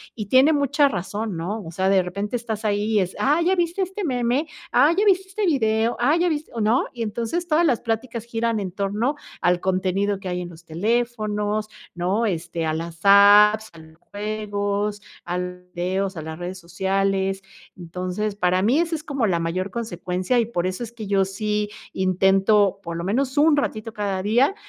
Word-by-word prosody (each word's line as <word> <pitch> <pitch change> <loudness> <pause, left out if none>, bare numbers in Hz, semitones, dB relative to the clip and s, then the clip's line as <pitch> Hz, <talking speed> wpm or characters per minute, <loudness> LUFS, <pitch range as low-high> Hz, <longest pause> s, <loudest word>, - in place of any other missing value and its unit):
Y 215 - -4
tiene 260 +8 +5
mucha 285 -1 +3
razón, 205 -2 -3
¿no? 200 +6 -4
O 165 - -8
sea, 190 +3 0
de 195 -1 +4
repente 200 +5 -4
estás 225 -2 -4
ahí, 205 -1 +1
y 210 - +4
es: 185 0 -3
"Ah, 295 +4 +3
¿ya 370 +3 +3
viste 350 +2 0
este 385 +3 -5
meme? 255 0 0 0.2
Ah, 285 +5 +5
¿ya 415 - +3
viste 385 -1 +3
este 410 +2 -2
video? 225 -7 +1
Ah, 265 +6 +3
¿ya 350 +1 +2
viste, 310 -2 -2
o - - -3
no?". 220 +3 +2
Y 240 -2 -4
entonces, 235 +11 -3
todas 330 +1 +3
las 250 -6 +1
pláticas 230 0 -3
giran 230 -1 -1
en 190 -3 -4
torno 205 +8 -1 0.3
al 175 0 +2
contenido 185 0 0 0.3
que 190 - -5
hay 180 0 -2
en 175 - -5
los 165 0 -14
teléfonos, 215 +3 -1 0.3
¿no? 185 +6 0
Este, 170 -4 -2
a 155 - 0
las 165 +1 -6
apps, 205 +2 +7
a - - -15
los 160 0 -16
juegos, 205 0 -3 0.2
a 175 +1 -2
los 180 0 -7
videos, 190 +2 -2
a 160 - -5
las 160 +1 -7
redes 180 +1 -5
sociales. 195 +2 -1 0.4
Entonces, 185 +4 -4
para 180 -1 +2
mí 240 +10 +3
esa 335 -1 0
es 310 - -6
como 275 -7 -1
la 175 -3 +1
mayor 185 +4 -2
consecuencia 185 0 -2
y 230 - +2
por 180 -6 -2
eso, 185 +4 -3
es 235 0 -8
que 220 -3 -7
yo 195 -1 +2
sí 210 +2 -2 0.2
intento, 195 +2 +3
por 170 -2 -6
lo 170 - -4
menos 260 +8 -1
un 300 0 +5
ratito 225 -5 -2
cada 200 -3 -2
día, 245 - +3
210 Hz, 200 wpm, -23 LUFS, 185-240 Hz, 0.4 s, apps